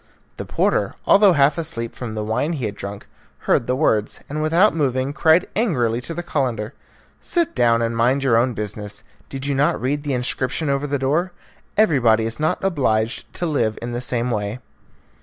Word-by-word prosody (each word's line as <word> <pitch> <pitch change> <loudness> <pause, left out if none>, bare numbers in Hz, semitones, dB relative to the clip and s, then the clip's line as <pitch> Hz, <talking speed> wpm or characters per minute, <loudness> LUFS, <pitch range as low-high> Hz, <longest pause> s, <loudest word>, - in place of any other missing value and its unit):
The - - -5
porter, - - 0
although 200 -2 +6
half 145 +2 +3
asleep 115 -8 -4
from 115 -3 -6
the 105 - -2
wine 110 +10 -1
he 135 -7 -3
had 105 - -3
drunk, 100 0 -7 0.4
heard 115 - +2
the 125 - +1
words, 110 -7 0
and 150 +2 -4
without 170 +7 +4
moving 135 -3 0
cried 160 +4 +3
angrily 125 - +1
to 165 - -4
the 175 - -4
Calender, 125 -8 -2 0.5
"Sit 340 -2 0
down 115 -2 +3
and 115 0 -1
mind 125 +4 +2
your 130 -4 +3
own 120 +1 +2
business. 105 0 -6 0.3
Did 135 0 -6
you 140 - 0
not 140 +2 +1
read 140 +4 -1
the 145 -2 -2
inscription 130 +4 -1
over 140 +1 -1
the 140 0 -1
door? 155 +7 0 0.4
Everybody 120 - +4
is 115 +3 -4
not 155 +4 0
obliged 125 - 0
to 175 - -2
live 120 -9 0
in 120 +1 -5
the 120 +1 -3
same 125 -1 -1
way." 105 +1 -2
130 Hz, 190 wpm, -21 LUFS, 115-155 Hz, 0.5 s, although